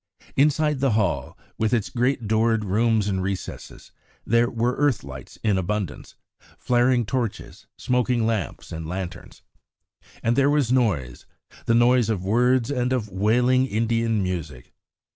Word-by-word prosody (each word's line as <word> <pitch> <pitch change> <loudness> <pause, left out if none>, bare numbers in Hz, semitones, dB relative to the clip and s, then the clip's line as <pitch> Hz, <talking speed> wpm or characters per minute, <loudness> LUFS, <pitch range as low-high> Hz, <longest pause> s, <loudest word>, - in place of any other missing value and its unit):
Inside 150 +1 +2
the 135 -3 +2
hall, 85 - -1 0.2
with 110 +2 +1
its 110 -4 -2
great 125 -2 0
doored 110 0 +1
rooms 110 +1 +1
and 95 -2 -1
recesses, 95 0 -6 0.3
there 115 +1 +3
were 120 +1 -1
earth 145 - +1
lights 65 -2 -10
in 105 -3 +2
abundance, 95 -4 -4 0.4
flaring 120 0 +2
torches, 120 -2 -4
smoking 125 -2 0
lamps 110 - -3
and 80 0 -6
lanterns. 90 -1 -7 0.8
And 115 +1 +2
there 140 +1 +3
was 145 -5 +1
noise 95 - 0 0.4
the 115 - +3
noise 120 -1 +4
of 95 -5 -2
words 125 +4 +2
and 125 -2 -1
of 120 -5 -1
wailing 120 +7 +2
Indian 115 -1 0
music. 80 -9 -5
115 Hz, 140 wpm, -24 LUFS, 95-125 Hz, 0.8 s, noise